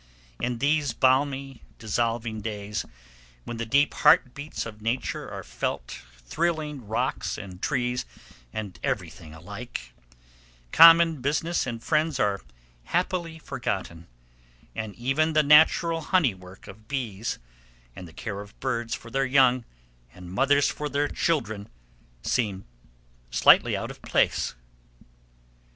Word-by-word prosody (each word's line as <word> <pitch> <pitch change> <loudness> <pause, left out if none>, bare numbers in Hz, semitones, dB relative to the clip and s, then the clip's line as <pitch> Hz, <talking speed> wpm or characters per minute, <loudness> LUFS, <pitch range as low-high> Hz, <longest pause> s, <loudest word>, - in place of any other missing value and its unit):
In 125 0 -2
these 145 0 +1
balmy, 135 +1 +1 0.2
dissolving 115 0 -2
days, 105 -1 -4 0.6
when 120 - -6
the 115 0 -4
deep 140 +4 +3
heart 150 -4 +5
beats 145 +1 -5
of 110 -2 -9
Nature 115 +4 -2
are - - -7
felt 60 0 -4 0.2
thrilling 150 - -2
rocks 110 - -2
and 95 -2 -9
trees 125 -3 -1 0.4
and 105 -4 -6
everything 80 -4 -4
alike, 100 - -8 0.8
common 165 -3 +8
business 150 +4 0
and 115 -2 -5
friends 155 -3 +1
are 100 - +1 0.4
happily 175 - -1
forgotten, 95 - -4 0.7
and 110 -2 -5
even 135 +6 +1
the 155 0 +4
natural 160 +3 +5
honey 160 - +2
work 95 +1 -14
of 110 +2 -13
bees, 115 -6 -3 0.6
and 90 - -9
the - - -13
care 100 +1 -5
of 100 0 -14
birds 120 -3 -2
for 115 - -12
their 135 +1 +1
young, 130 -2 +4 0.5
and 90 -1 -10
mothers 140 +5 +3
for 150 0 -3
their 145 +1 0
children, 110 -11 -1 0.5
seem 100 -6 -1 0.6
slightly - - +5
out - - -4
of - - -14
place. - - +1
125 Hz, 125 wpm, -26 LUFS, 105-145 Hz, 0.8 s, common